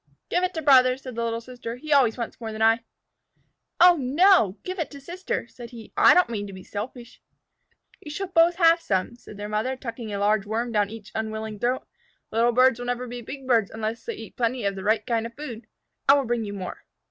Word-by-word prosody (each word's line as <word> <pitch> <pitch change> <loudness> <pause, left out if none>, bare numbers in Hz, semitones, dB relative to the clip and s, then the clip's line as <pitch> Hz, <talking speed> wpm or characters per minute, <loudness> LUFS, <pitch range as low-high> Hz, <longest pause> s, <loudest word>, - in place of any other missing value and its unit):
"Give 355 - +1
it 365 0 -1
to 320 - -3
Brother," 255 -3 +6
said 260 -1 -9
the 235 +1 -3
little 230 0 -2
sister. 240 -1 -7
"He 300 +4 -2
always 255 -5 +4
wants 235 0 -6
more 225 -1 -4
than 220 0 -2
I." 225 +1 +5 1.0
"Oh, 355 0 +7
no. 285 - +4
Give 370 0 -5
it 325 - -2
to 280 - -11
Sister," 350 -2 -4
said 240 0 -11
he. 230 -3 -12
"I - - +7
don't 360 -1 +5
mean 205 -3 -4
to 195 - -9
be 185 -1 -10
selfish." 235 +3 -8 0.8
"You 300 - -10
shall 345 +7 -3
both 335 0 +4
have 335 -1 +5
some," 195 - -1
said 225 -3 -13
their 205 0 -5
mother, 215 +5 -1
tucking 230 -3 -7
a 200 - -3
large 205 0 +1
Worm 230 +3 -2
down 205 -2 +1
each 220 -1 -10
unwilling 220 -1 -4
throat. 250 +3 -1 0.4
"Little 230 +2 +3
birds 255 0 +4
will 245 - -5
never 245 0 -2
be 245 0 -7
big 270 +3 -8
birds 230 -5 +3
unless 225 +1 -4
they 465 - -5
eat 225 - -11
plenty 240 -1 -1
of 200 - +1
the 190 - -7
right 215 +2 +1
kind 230 -2 -1
of 230 - -16
food. 245 -6 -8 0.4
I 280 - +9
will 280 -2 +1
bring 235 -1 -1
you 205 - -6
more." 185 -3 -7
235 Hz, 230 wpm, -25 LUFS, 220-270 Hz, 1.0 s, I